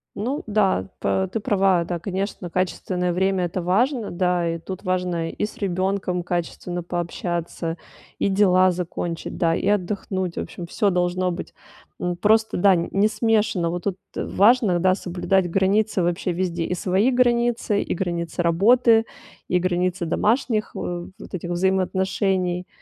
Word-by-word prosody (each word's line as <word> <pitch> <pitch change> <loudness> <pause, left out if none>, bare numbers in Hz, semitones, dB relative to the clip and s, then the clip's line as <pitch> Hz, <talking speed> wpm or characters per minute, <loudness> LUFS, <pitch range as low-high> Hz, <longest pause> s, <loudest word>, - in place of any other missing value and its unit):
Ну 255 +8 -2
да, 200 - +1
п 95 -1 0
ты - - -1
права. 195 -4 +2
Да, 175 - -3
конечно, 190 -1 -4
качественное 180 0 -1
время- 190 0 +1
это 175 +1 -3
важно. 225 - +1
Да, 180 -1 +1
и 165 0 -2
тут 185 +3 -7
важно 180 -3 -1
и - - -2
с - - -9
ребенком 185 -1 -1
качественно 175 0 -3
пообщаться, 170 -1 -3 0.4
и - - +2
дела 185 -2 +4
закончить, 170 -1 -4
да, 165 -1 +2
и - - -2
отдохнуть. 190 -2 -1
В - - 0
общем, 175 - -7
всё 200 +3 +1
должно 180 0 0
быть, 175 - -6 0.5
м, 180 0 -1
просто, 220 +3 +2
да, 195 +1 +5
не 195 +4 +1
смешано. 215 -6 +1
Вот 175 0 -4
тут 195 -2 -1 0.2
важно, 210 -3 +3
да, 185 +1 +4
соблюдать 185 0 0
границы 195 +2 +2
вообще 175 +2 0
везде: 175 -1 -2
и 180 - -2
свои 190 +7 +2
границы, 240 -4 +2
и - - -2
границы 170 -1 -2
работы, 225 +7 +4 0.4
и 180 - +2
границы 180 0 0
домашних, 215 +5 0
э, 175 -1 -4
вот - - -12
этих 175 -1 -4
вот 175 - -1
взаимоотношений, 190 0 0
185 Hz, 155 wpm, -23 LUFS, 175-200 Hz, 0.5 s, да